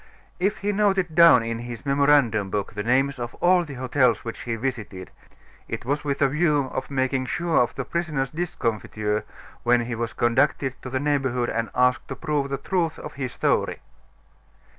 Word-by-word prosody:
If 195 Hz, +3 st, +1 dB
he 205 Hz, +1 st, -1 dB
noted 195 Hz, -4 st, +1 dB
down 165 Hz, -7 st, +7 dB
in 115 Hz, 0 st, -3 dB
his 120 Hz, +1 st, -8 dB
memorandum 140 Hz, -7 st, +3 dB
book 100 Hz, 0 st, -3 dB
the 105 Hz, -, -3 dB
names 135 Hz, +4 st, +1 dB
of 120 Hz, 0 st, -5 dB
all 180 Hz, 0 st, +3 dB
the 145 Hz, -5 st, -8 dB
hotels 125 Hz, -3 st, +1 dB
which 115 Hz, -, -5 dB
he 115 Hz, -1 st, -2 dB
visited, 110 Hz, -6 st, -5 dB, 0.6 s
it -, -, -5 dB
was 145 Hz, +3 st, -1 dB
with 140 Hz, 0 st, 0 dB
a -, -, +5 dB
view 150 Hz, -2 st, +1 dB
of 130 Hz, -, -4 dB
making 130 Hz, -1 st, 0 dB
sure 170 Hz, -1 st, +1 dB
of 120 Hz, -, -1 dB
the 135 Hz, -, -4 dB
prisoner's 155 Hz, -6 st, -2 dB
discomfiture 110 Hz, -10 st, -2 dB, 0.4 s
when 120 Hz, 0 st, +3 dB
he 120 Hz, +1 st, -4 dB
was 115 Hz, 0 st, -3 dB
conducted 130 Hz, +2 st, +1 dB
to 130 Hz, -, -7 dB
the 130 Hz, +1 st, -1 dB
neighborhood 135 Hz, -4 st, 0 dB
and 115 Hz, -1 st, -2 dB
asked 125 Hz, 0 st, +2 dB
to -, -, -5 dB
prove 150 Hz, -3 st, -1 dB
the 140 Hz, -, -2 dB
truth 170 Hz, +1 st, -1 dB
of 150 Hz, -, -8 dB
his 130 Hz, -3 st, -4 dB
story. -, -, 0 dB
130 Hz, 185 wpm, -24 LUFS, 120-150 Hz, 0.6 s, down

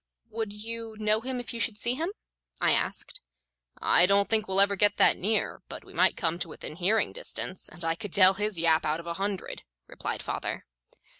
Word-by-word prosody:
"Would 220 Hz, -1 st, -3 dB
you 225 Hz, +1 st, -6 dB
know 215 Hz, 0 st, +1 dB
him 255 Hz, +1 st, -4 dB
if 245 Hz, -, -7 dB
you 235 Hz, -, -5 dB
should 225 Hz, -2 st, -1 dB
see 235 Hz, +3 st, +1 dB
him?" 320 Hz, +7 st, -2 dB, 0.5 s
I -, -, +3 dB
asked. -, -, -1 dB, 0.6 s
"I 180 Hz, -, +4 dB
don't 200 Hz, +1 st, +3 dB
think 220 Hz, -1 st, +4 dB
we'll 190 Hz, 0 st, +3 dB
ever 200 Hz, 0 st, +5 dB
get 205 Hz, +1 st, +3 dB
that -, -, +6 dB
near, 215 Hz, +3 st, -1 dB
but -, -, -8 dB
we -, -, -15 dB
might -, -, +3 dB
come 170 Hz, -3 st, -1 dB
to 175 Hz, -, -2 dB
within 155 Hz, 0 st, -9 dB
hearing 205 Hz, +5 st, +1 dB
distance, 185 Hz, -, -4 dB
and 175 Hz, -1 st, -8 dB
I 165 Hz, -, +1 dB
could 185 Hz, +3 st, -8 dB
tell 190 Hz, -1 st, +7 dB
his 205 Hz, 0 st, -2 dB
yap 160 Hz, -1 st, +3 dB
out 155 Hz, +1 st, -1 dB
of 170 Hz, -, -10 dB
a 170 Hz, -, -3 dB
hundred," 200 Hz, -2 st, -3 dB, 0.3 s
replied -, -, -5 dB
father. -, -, -4 dB
205 Hz, 210 wpm, -27 LUFS, 180-220 Hz, 0.6 s, tell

